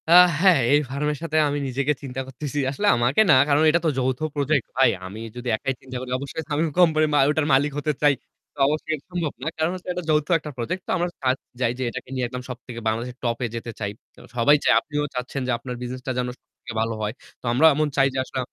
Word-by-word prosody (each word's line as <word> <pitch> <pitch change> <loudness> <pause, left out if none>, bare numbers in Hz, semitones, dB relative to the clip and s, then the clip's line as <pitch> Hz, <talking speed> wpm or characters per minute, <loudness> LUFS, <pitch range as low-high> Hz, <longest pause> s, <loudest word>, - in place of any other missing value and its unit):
আ - - +2 0.3
হ্যাঁ, 180 -4 +6
এই 145 - +6
ফার্মের 150 +2 -1
সাথে 155 -1 -1
আমি 145 0 -1
নিজেকে 140 +3 0
চিন্তা 135 -1 -4
করতেছি 140 +2 -5
আসলে 205 +9 -1
আমাকে 120 - +3
না, - - +8
কারণ 145 0 +3
এটা 170 +2 +3
তো - - +4
যৌথ 130 -1 0 0.2
project, 145 -2 +1
ভাই 135 - +6 0.2
আমি 100 +4 -8 0.2
যদি 125 0 -7
একাই 135 +5 -2
চিন্তা 130 -1 -7
করি 130 0 -7
অবশ্যই 140 +4 -5
আমি 145 - +1 0.2
কোম্পানির 155 -3 +4
মা 145 - +4
ওটার 150 0 +1
মালিক 145 +3 +3
হতে 150 +1 0
চাই। 145 -1 +5 0.4
তো - - -31
অবশ্যই 155 +2 -1
এটা 145 - -14
সম্ভব 170 -4 -2
না। - - -3
কারণ 160 +2 +1
হচ্ছে 185 0 -8
এটা 180 0 -4
যৌথ 150 -1 +3
একটা 150 0 -7
project. 175 +11 -3
তো - - -2
আমার 175 0 0
কা 130 - +1 0.3
যাই 120 -2 +2
যে - - -1
এটাকে - - -8
নিয়ে 130 -1 -1
একদম 125 +1 -6
সবথেকে 125 -1 -7
বাংলাদেশের 120 +3 -2
top 115 -1 0
এ - - 0
যেতে 115 0 -5
চাই। 105 -2 -2 0.3
আ - - -13
সবাই 125 +5 +5
চায়, - - +5
আপনিও 145 -1 -3
চাচ্ছেন 125 +2 -3
যে - - +1
আপনার 125 0 -6
business 125 +1 -5
টা - - +1
যেন 125 - -1
সবথেকে - - -12
ভালো 115 0 -2
হয়। 105 0 -2 0.3
তো - - -13
আমরাও 155 +6 +6
এমন 155 +1 +1
চাই 135 -1 +5
যে - - -4
আসলে 130 - -5
135 Hz, 245 wpm, -24 LUFS, 125-150 Hz, 0.4 s, না